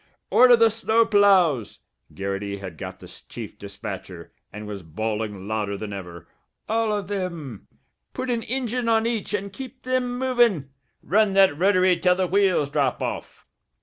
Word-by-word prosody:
"Order 245 -1 +7
the 230 -1 +4
snow 225 +1 +2
ploughs!" 190 - +3 0.3
Garrity 100 +1 -4
had 95 -4 -8
got - - -7
the - - -12 0.2
chief - - -8
dispatcher, 95 -3 -8 0.2
and 105 +1 -8
was 105 -2 -6
bawling 105 +3 -4
louder 105 -2 -2
than 105 0 -6
ever. 90 -3 -9 0.4
"All 225 0 +1
of 205 -3 -2
thim! 170 - -5 0.4
Put 255 0 -3
an 235 -1 0
injine 245 0 -2
on 225 0 +3
each 220 -3 -1
and 200 -1 -5
keep 260 +2 -9
thim 250 -1 -1
movin'! 240 - +2 0.3
Run 210 +1 +2
that 195 -5 +5
rotary 185 0 +3
till 180 +1 +3
the 185 0 0
wheels 185 -6 +2
drop 140 -4 0
off!" - - -5
185 Hz, 155 wpm, -24 LUFS, -, 0.4 s, Order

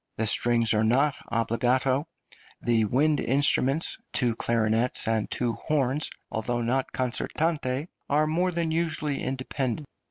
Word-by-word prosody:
The 110 - 0
strings 115 +1 +4
are 110 0 +2
not 135 +6 +2
obbligato, 125 +5 +1 0.5
the 115 -2 +1
wind 145 +7 +2
instruments 140 +3 +2
two 120 -3 +1
clarinets 115 +1 +1
and 110 -1 0
two 120 -2 -1
horns 145 0 -1 0.2
although 120 +2 -2
not 130 +3 -1
concertante, 135 +2 -1 0.2
are 150 +2 +3
more 170 +4 0
than 165 -2 -1
usually 155 -3 -1
independent. 130 +1 -3
130 Hz, 125 wpm, -26 LUFS, 115-150 Hz, 0.5 s, strings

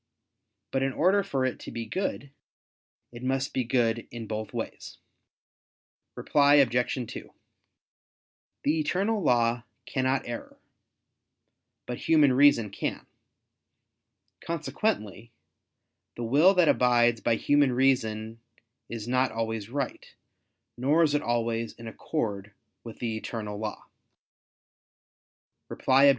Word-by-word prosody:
But 135 - 0
in 135 0 0
order 185 +8 +3
for 140 -9 -1
it 130 - -2
to - - -8
be 115 -1 -5
good, 140 - -3 0.8
it 120 0 -10
must 135 +1 -1
be 130 - 0
good 115 -1 0
in 115 -1 -7
both 110 0 -5
ways. - - -6 1.2
Reply 145 0 +4
Obj. 135 -5 +4 0.3
2: - - -9 1.3
The 155 +3 +1
eternal 195 +8 0
law 120 -5 +2 0.2
cannot 130 0 0
err, 120 -1 -7 1.3
but 125 - -5
human 150 -5 +4
reason 125 -6 +4
can. - - -4 1.4
Consequently 135 - -3 0.8
the 120 - -5
will 150 +12 +5
that 180 -3 +4
abides 120 -3 +3
by 115 - +2
human 145 +3 +3
reason, 115 -4 0 0.5
is 115 -1 -6
not 130 0 +1
always 110 -2 -3
right, 140 0 -5 0.6
nor 145 +6 +3
is 150 -2 +2
it 145 - +2
always 115 -1 -1
in 115 - -11
accord 105 -5 -4 0.3
with 115 -2 -9
the 115 -2 -3
eternal 105 -2 -5
law. 105 -1 -5 1.8
Reply 135 +1 +3
Obj. - - +8
125 Hz, 115 wpm, -27 LUFS, 115-145 Hz, 1.8 s, Obj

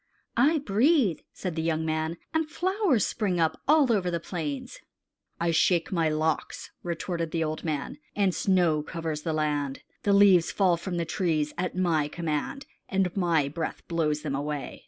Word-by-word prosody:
"I 290 +7 +4
breathe," 255 - +2
said 180 -4 -5
the 160 - -1
young 160 -1 0
man, 160 +1 -1 0.2
"and 320 -1 0
flowers 370 - +1
spring 195 -6 -1
up 160 -1 +1
all 290 -5 +5
over 190 -4 +1
the 170 -1 -1
plains." 155 -5 -5 0.6
"I 170 0 +1
shake 165 +1 +2
my 165 -4 +2
locks," 155 +1 -2
retorted 170 -1 -3
the 165 0 -1
old 155 0 -3
man, 155 - -3 0.2
"and 195 -3 +2
snow 175 -6 +2
covers 160 -1 -4
the 160 - -2
land. 150 -3 -1 0.2
The 200 - +2
leaves 195 -4 +6
fall 185 -3 +3
from 175 +1 -4
the 170 - -1
trees 160 -4 0
at 180 0 -2
my 165 -5 +2
command, 165 - -3 0.2
and 190 -2 0
my 170 -7 +2
breath 160 +3 -5
blows 155 -3 0
them 145 -3 -2
away. 145 +1 -4
170 Hz, 170 wpm, -27 LUFS, 155-195 Hz, 0.6 s, leaves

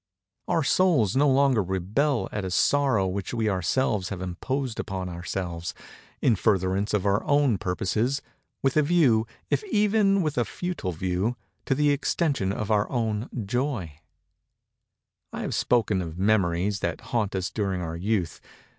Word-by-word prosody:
Our 165 - +1
souls 135 - +3
no 145 +2 +4
longer 135 -4 +4
rebel 100 - 0
at 105 - -3
a 95 - -3
Sorrow 130 0 +2
which 95 +5 -3
we 110 -2 0
ourselves 95 - 0
have 95 - -5
imposed 115 +8 -3
upon 95 -1 -3
ourselves, 85 0 -4 0.5
in 115 - +4
furtherance 100 0 +1
of 100 -1 -1
our 100 +1 +2
own 140 -8 +2
purposes—with 120 +8 -2
a - - +6
view—if 140 - +1
even 205 - +3
with 150 -5 -1
a 120 - +2
futile 175 - -4
view—to 95 +10 -3
the 145 +1 +3
extension 140 - 0
of 105 +1 -3
our 105 -1 +2
own 115 -3 -1 0.2
Joy. 110 - -2 1.3
I - - -5
have - - -3
spoken 110 -6 +2
of 80 -1 -6
Memories 100 -1 +1
that 85 -3 -3
haunt 105 -5 0
us 95 -1 -2
during 95 -4 -1
our 80 -1 -4
youth. 95 -1 -1
105 Hz, 145 wpm, -26 LUFS, 95-135 Hz, 1.3 s, a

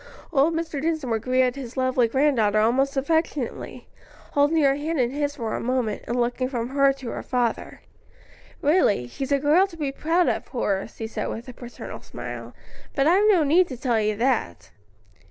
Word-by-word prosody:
Old 300 +3 +3
Mr. 325 -4 -3
Dinsmore 305 -8 -1
greeted 255 +2 +1
his 260 -2 -8
lovely 255 -2 +2
granddaughter 230 -5 +2
almost 270 +6 +2
affectionately, 295 -2 -2 0.4
holding 290 +2 +3
her 275 -1 +5
hand 300 +2 -2
in 245 -1 +1
his 290 +1 -2
for 230 -5 -4
a - - -2
moment, 245 -3 -1
and 240 +2 -1
looking 245 +2 0
from 240 -2 -3
her 275 0 +4
to 265 -3 -7
her - - -5
father. 245 -3 -2 0.8
"Really, 285 - +3
she's 270 - -5
a 280 - +4
girl 305 +7 +4
to 340 -4 -13
be 290 -3 -2
proud 330 +5 +1
of, - - -1
Horace," 205 -4 -2
he 225 - -4
said 220 - -4
with 230 +3 -6
a - - -8
paternal 240 0 -9
smile. - - -8 0.4
"But 275 - +2
I've 385 +7 +4
no 365 -6 +5
need 335 +5 +4
to 255 - -7
tell 235 -3 +1
you 215 0 0
that." 230 - -1
270 Hz, 185 wpm, -24 LUFS, 240-295 Hz, 0.8 s, her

